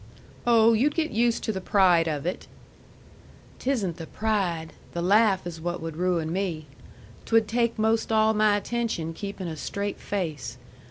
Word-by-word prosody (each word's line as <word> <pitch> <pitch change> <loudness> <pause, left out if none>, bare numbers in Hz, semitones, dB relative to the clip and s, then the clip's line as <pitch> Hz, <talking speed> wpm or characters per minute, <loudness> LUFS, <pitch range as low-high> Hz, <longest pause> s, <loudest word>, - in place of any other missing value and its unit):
"Oh, 230 -1 +6
you'd 275 +7 +2
get 325 -1 0
used 235 +1 +1
to - - 0
the 190 -3 -4
pride 185 -4 +4
of 150 -2 -2
it." 180 - -3 1.1
"'Tisn't 215 - -1
the 165 - -7
pride. 185 -7 -1 0.2
The 170 - -2
laugh 200 0 +4
is 165 -2 -6
what 175 +1 -3
would 165 -1 -6
ruin 170 -2 0
me. 175 -5 -2 0.6
'Twould 225 -1 +3
take 235 +1 0
'most 220 +1 +1
all 220 0 +4
my 210 -1 +3
attention 220 -7 -2
keeping 200 0 -6
a 160 - -4
straight 200 +6 -4
face. 155 -11 -4
200 Hz, 160 wpm, -26 LUFS, 170-220 Hz, 1.1 s, Oh